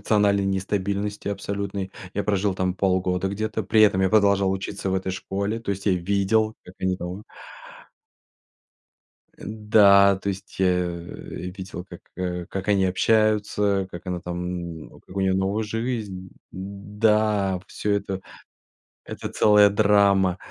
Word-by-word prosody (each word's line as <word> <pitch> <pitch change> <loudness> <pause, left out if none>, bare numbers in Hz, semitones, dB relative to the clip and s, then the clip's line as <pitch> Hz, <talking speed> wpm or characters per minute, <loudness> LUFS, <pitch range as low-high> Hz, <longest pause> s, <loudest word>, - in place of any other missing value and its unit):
эмоциональной 100 -2 +2
нестабильности 100 +2 -2
абсолютной. 100 -1 -4 0.2
Я 100 - 0
прожил 100 -1 +1
там 95 -1 -1
полгода 95 -1 0
где-то, 110 +2 -3
при 105 +3 +2
этом 100 -3 +5
я 95 - +2
продолжал 100 -2 +4
учиться 95 0 -3
в - - 0
этой 95 0 -2
школе. 100 +4 -3
То 110 - -4
есть 100 +1 -4
я 100 - +4
видел, 100 +4 +1
как 90 - -13
они 95 0 0
там 90 +4 -6 2.1
Э, - - -14
да, 100 -2 +5
то 100 - -4
есть, 95 -1 -6
я, 95 - +3
э, 90 -1 +1 0.7
видел, 95 -2 -7
как, 85 - -10 0.2
э, 90 -1 -3
как 95 +1 -5
они 100 -2 +3
общаются, 105 0 +2
как 85 0 -9
она 90 -1 -3
там, 85 -2 -5
м, - - -16
как 95 - -14
у - - 0
неё 95 -1 +2
новая 95 +3 0
жизнь 110 -5 -4 0.2
да, 100 +1 0
вот 90 0 -6
всё 105 - -2
это. 100 -2 -2 0.9
Это - - -6
целая 105 -1 +5
драма. 100 -3 +3
100 Hz, 150 wpm, -24 LUFS, 95-105 Hz, 2.1 s, этом